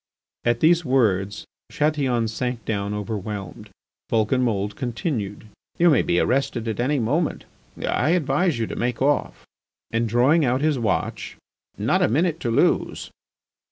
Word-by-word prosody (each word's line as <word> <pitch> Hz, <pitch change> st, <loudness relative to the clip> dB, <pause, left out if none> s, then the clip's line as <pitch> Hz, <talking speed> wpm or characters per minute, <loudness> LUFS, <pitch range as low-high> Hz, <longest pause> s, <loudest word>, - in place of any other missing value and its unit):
At 120 Hz, 0 st, +1 dB
these 170 Hz, +2 st, +4 dB
words 105 Hz, -, +1 dB, 0.3 s
Chatillon 135 Hz, -6 st, +1 dB
sank 120 Hz, +1 st, -3 dB
down 100 Hz, -2 st, -2 dB
overwhelmed. 105 Hz, -1 st, -5 dB, 0.4 s
Vulcanmould 110 Hz, -3 st, +1 dB
continued: 120 Hz, -, -3 dB, 0.3 s
"You 170 Hz, 0 st, +5 dB
may 140 Hz, -, +4 dB
be 85 Hz, -, +1 dB
arrested 125 Hz, -3 st, 0 dB
any 140 Hz, +5 st, +1 dB
moment. 145 Hz, +8 st, -1 dB, 0.3 s
I 130 Hz, -, 0 dB
advise 160 Hz, -1 st, +1 dB
you 115 Hz, -, -1 dB
to -, -, -6 dB
make 120 Hz, 0 st, -2 dB
off." 145 Hz, +2 st, 0 dB, 0.5 s
And 115 Hz, 0 st, 0 dB
drawing 130 Hz, +8 st, +4 dB
out 130 Hz, 0 st, +1 dB
his 150 Hz, -3 st, +1 dB
watch: 110 Hz, -5 st, -2 dB, 0.4 s
"Not -, -, +1 dB
a -, -, +4 dB
minute 160 Hz, +7 st, +1 dB
to 120 Hz, -, -2 dB
lose." 115 Hz, -, +1 dB
120 Hz, 135 wpm, -23 LUFS, 110-145 Hz, 0.5 s, You